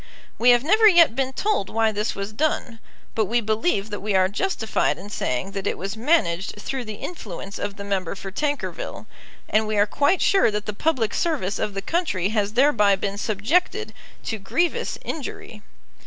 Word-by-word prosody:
We 245 - +5
have 240 0 +6
never 430 +8 +5
yet 340 - +6
been 265 0 0
told 405 - 0
why 225 0 +2
this 210 +1 -2
was 200 +2 -5
done; 240 -3 -1 0.3
but 220 - +1
we 235 +5 +1
believe 220 - 0
that 205 - -3
we 205 0 -1
are 185 0 +4
justified 225 - 0
in 200 +4 -10
saying 155 +2 -2
that 195 -1 -4
it - - -1
was 195 +3 -4
managed 220 - +1
through 260 +3 -4
the 215 -1 -6
influence 200 - -7
of 200 - -3
the 200 - -7
member 195 -3 -2
for 195 0 -7
Tankerville; 290 +7 -3 0.4
and 215 0 +2
we 215 -1 -1
are 205 - +5
quite 285 - +2
sure 390 - +4
that 210 0 -3
the 210 - -3
public 235 -2 0
service 290 - -1
of 205 - -2
the 195 - -3
country 305 - 0
has 210 -1 0
thereby 235 -6 +4
been 200 +1 -3
subjected 300 - 0 0.3
to 220 - -3
grievous 340 - -1
injury. 250 -7 -6
215 Hz, 185 wpm, -23 LUFS, 200-285 Hz, 0.4 s, have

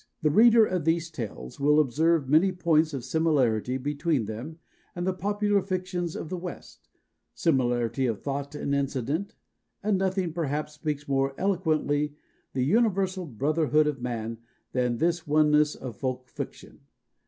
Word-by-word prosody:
The 150 - +3
reader 225 +4 +7
of 185 -5 -2
these 165 +1 0
tales 105 - -7
will 150 +2 +4
observe 155 +2 +2
many 160 +7 +4
points 165 -3 +2
of 135 -4 -5
similarity 130 -6 +1
between 145 -1 -1
them 120 +10 -6 0.4
and 175 0 -3
the 190 - +1
popular 205 +2 +1
fictions 185 -2 -3
of - - -5
the 185 - -3
West 180 0 -9 0.5
similarity 125 -4 +1
of 115 -4 -2
thought 140 +1 -4
and 140 - -2
incident 140 - -1 0.5
and 205 -2 +1
nothing, 190 -3 0
perhaps, 150 -2 -2
speaks 150 -1 -4
more 135 0 0
eloquently 155 -6 0 0.4
the 130 -1 0
universal 190 - +1
brotherhood 150 +4 +2
of 145 -4 -2
man 115 -2 -4 0.3
than 125 -2 0
this 170 +1 0
oneness 150 0 +4
of 120 -5 -8
folk 130 -1 -3
fiction. - - -8
150 Hz, 145 wpm, -27 LUFS, 135-175 Hz, 0.5 s, reader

